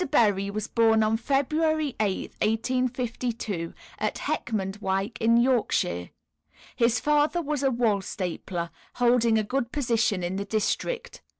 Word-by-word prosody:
Berry 205 -8 +3
was 210 +1 -3
born 225 -1 +3
on 215 +1 +2
February 295 +4 +1
8th, 200 -3 -1
1852, 235 -5 -1 0.3
at - - -1
Heckmondwike, 195 0 -2
in 230 +1 +4
Yorkshire. 235 - +1 0.7
His 235 0 +3
father 300 +3 +2
was 300 -3 -2
a 270 - +3
wool 230 -5 +1
stapler, 175 -2 -4 0.2
holding 240 -2 +3
a 215 - +2
good 240 +2 -2
position 230 -9 +1
in 180 +2 -2
the 200 - -3
district. 465 - -2
230 Hz, 125 wpm, -26 LUFS, 200-255 Hz, 0.7 s, in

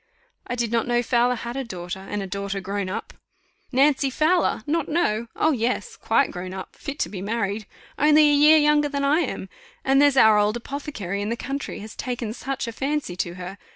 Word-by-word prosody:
"I 245 - -2
did 235 -2 -1
not 230 0 +1
know 240 0 +2
Fowler 245 +1 +2
had 235 +1 -6
a 270 - -2
daughter, 180 -4 -6
and 200 +1 -4
a - - -4
daughter 200 +1 -3
grown 195 0 -3
up." - - -5 0.6
"Nancy 275 +1 +3
Fowler! 310 -3 +1
not 320 0 -1
know! 235 -9 0
Oh! 315 - +2
yes, 240 -4 -1
quite 240 +4 +1
grown 185 +1 -6
up, 190 - -8
fit 280 +1 -6
to - - +1
be 190 -3 -6
married 205 0 -2 0.3
only 300 0 +6
a - - +4
year 300 +2 +7
younger 295 -1 +3
than 280 -1 -2
I 290 +3 +3
am. 270 - -3 0.4
And 270 +1 +4
there's 285 -2 +4
our 220 -4 +7
old 210 +2 +2
apothecary 235 -7 -5
in 205 - -2
the 235 - -2
country 275 -2 -5
has 215 +1 -9
taken 240 -3 -4
such 265 +1 -4
a - - -3
fancy 275 -5 -2
to 175 -1 -2
her! 185 +2 -8
240 Hz, 210 wpm, -24 LUFS, 205-280 Hz, 0.6 s, year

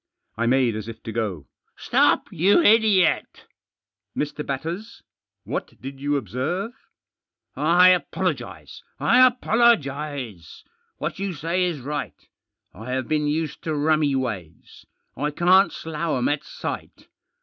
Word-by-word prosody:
I 115 +1 -1
made 125 -2 +2
as 110 0 -5
if 115 -1 -9
to 115 - -5
go. 100 -10 -3 0.2
" - - -48
Stop, - - +3
you 190 - +4
idiot! 210 - +3 0.2
" - - -70
" - - -25
Mr. 150 0 -2
Batters? 165 +11 -5 0.4
What - - -5
did 135 +1 -8
you 145 0 +1
observe? 140 - -3 0.6
" - - -55 0.3
"I 185 - +9
apologise! 140 - -2 0.2
I 255 +2 +6
apologise! 145 - 0 0.3
What - - -4
you 195 -1 -2
say 170 +4 -1
is 165 -6 -3
right. 145 +2 -4 0.6
I 110 +3 -10
have 130 -1 -2
been 150 -1 0
used 155 +1 -2
to 160 -2 -1
rummy 150 -1 +2
ways. 100 -11 -6 0.3
I 145 +1 -1
can't 180 +6 +4
slough 160 -1 -3
'em 125 - +1
at 145 0 -1
sight. - - -7
150 Hz, 140 wpm, -23 LUFS, 125-180 Hz, 0.6 s, I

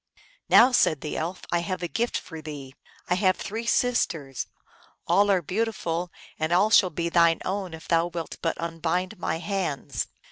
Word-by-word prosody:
" - - -31
Now," 250 +3 +7
said 155 - +3
the 150 - -4
Elf, 170 +4 -4
" - - -11
I 175 - +2
have 180 0 -3
a - - 0
gift 235 +6 -1
for 160 -2 -8
thee. 145 -3 -8 0.3
I 180 - +2
have 185 0 +2
three 225 +3 -5
sisters: 165 - 0 0.6
all 200 +4 +4
are 190 -3 +3
beautiful, 180 -3 -2 0.3
and 155 +1 -1
all 195 +5 +4
shall 190 -4 +6
be 170 +1 -2
thine 170 -1 +4
own 190 -3 -3
if 160 - -13
thou 165 0 +3
wilt 170 -2 -6
but 165 - -1
unbind 170 +4 -2
my 160 -1 -1
hands." 180 -6 -3
175 Hz, 185 wpm, -26 LUFS, 165-195 Hz, 0.6 s, Now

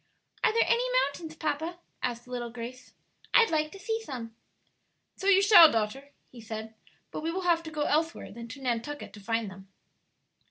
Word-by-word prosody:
"Are - - +5
there 460 +1 +3
any 475 +1 +2 0.2
mountains, 315 +3 -7
papa?" 315 +3 -2 0.2
asked 240 -1 -3
little 245 -1 -4
Grace. 245 +2 -9 0.4
"I'd 460 -5 +6
like 305 -1 +1
to - - -10
see 445 +3 -2
some." 230 - -7 0.8
"So 385 - -4
you 395 0 +6
shall, 390 -6 +9
daughter," 230 +6 -2 0.2
he 240 - -12
said; 220 0 -7 0.4
"but - - -5
we 320 - -2
will 375 +2 -3
have 340 -2 +3
to 325 - -8
go 300 -1 -1
elsewhere 320 +3 0
than 230 +2 -8
to 270 +4 -10
Nantucket 250 +4 -3
to 210 - -11
find 225 0 -2
them." 190 0 -13
285 Hz, 185 wpm, -29 LUFS, 230-330 Hz, 0.8 s, shall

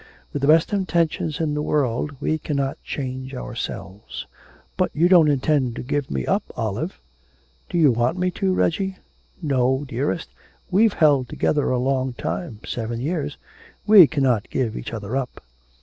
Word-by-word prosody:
With 145 - -2
the 140 - +1
best 160 +6 +4
intentions 170 -5 0
in 155 -2 0
the 150 - -1
world 145 -1 0
we 155 - 0
cannot 140 -3 -2
change 130 -1 -5
ourselves.' 105 -5 -6 0.5
'But - - +1
you 165 +4 +4
don't 175 -4 +6
intend 135 -3 +1
to - - -5
give 145 +1 -2
me 65 -2 -2
up, - - +1 0.2
Olive?' - - -3 0.7
'Do - - -1
you 155 -5 +6
want 120 +8 0
me 180 0 0
to, 190 +1 0
Reggie?' 190 +1 0 0.5
'No, 130 -1 +1
dearest, 140 +7 -2 0.4
we've 210 +3 +4
held 145 -6 +3
together 145 -2 0
a 130 - +1
long 130 0 0
time 120 - -4
seven 115 0 -3
years 145 +1 -2 0.5
we 205 -6 +9
cannot 130 -8 +1
give 120 -5 -1
each - - -6
other 110 +1 -4
up.' 135 -2 -3
140 Hz, 160 wpm, -23 LUFS, 125-160 Hz, 0.7 s, we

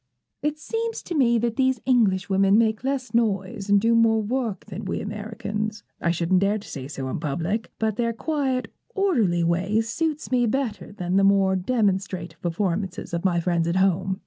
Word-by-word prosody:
'It 300 0 -1
seems 455 +7 -3
to 350 - -5
me 245 -6 +3
that 230 0 -1
these 260 -2 +2
Englishwomen 195 -4 +3
make 220 0 +2
less 265 -1 -2
noise 200 -3 0
and 205 0 +6
do 230 +3 +2
more 225 -1 +4
work 225 -1 -2
than 210 +1 -7
we 190 - -2
Americans. 210 0 -4 0.2
I 170 - +1
shouldn't 175 +2 +2
dare 200 +2 +2
to 205 - -10
say 135 -2 -6
so 135 -2 -5
in 130 - -3
public; 165 +8 -2
but 220 -1 -1
their 235 -1 +1
quiet, 265 0 -2 0.2
orderly 230 - +2
ways 190 +7 +1
suits 305 +5 -2
me 245 -2 +3
better 230 -4 -2
than 185 -2 -1
the 195 - +4
more 195 -1 +4
demonstrative 190 -4 -1
performances 180 +1 -2
of 170 - -2
my 180 -3 +2
friends 170 -1 0
at 170 - 0
home. 190 0 +1
205 Hz, 180 wpm, -24 LUFS, 185-235 Hz, 0.2 s, and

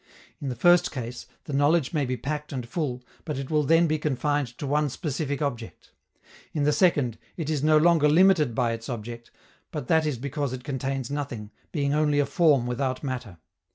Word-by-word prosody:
In 140 - -3
the 125 - -3
first 175 +8 +4
case, 125 -2 -6 0.2
the 145 - -7
knowledge 145 +1 +2
may 145 -4 0
be 130 0 -2
packed 150 +4 -4
and 125 -4 -4
full, 125 -4 -3 0.2
but 150 -4 -4
it 135 +1 -5
will 150 -1 +3
then 165 +4 +4
be 155 -1 0
confined 145 -1 0
to - - -5
one 150 +1 +1
specific 145 0 -3
object; 120 -5 -5 0.6
in 150 - 0
the 150 - +3
second, 145 - +2 0.2
it 160 -3 -2
is 150 -3 0
no 155 0 +5
longer 160 -1 +4
limited 160 -6 +4
by 120 -1 +1
its 115 +1 -6
object, 120 0 -6 0.4
but 150 -6 -5
that 160 -1 +3
is 145 -5 -1
because 140 +1 -3
it 125 -1 -6
contains 135 -1 -3
nothing, 125 -8 -4 0.2
being 140 -3 0
only 150 -1 +2
a 145 - +3
form 140 -3 +3
without 130 +2 -2
matter. 125 -9 -5
140 Hz, 195 wpm, -26 LUFS, 125-150 Hz, 0.6 s, no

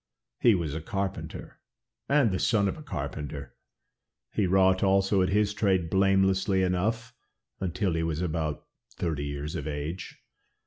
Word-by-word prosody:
He 115 -3 +5
was 80 -5 -2
a 80 - -4
carpenter, 95 +3 -5 0.5
and 140 -6 +4
the 95 - -1
son 105 -4 +2
of - - -2
a 155 - -10
carpenter, 75 - -5 0.8
he 100 - +1
wrought 95 0 +4
also 95 0 +3
at 90 - +2
his 105 +1 +2
trade 95 -6 +1
blamelessly 95 0 +3
enough 110 +6 -1 0.5
until 95 0 -1
he 80 - 0
was 80 -1 -1
about 80 -3 -2 0.3
thirty 75 -4 -2
years 70 +2 -4
of 80 -4 -4
age. 75 +4 -5
95 Hz, 145 wpm, -28 LUFS, 80-100 Hz, 0.8 s, He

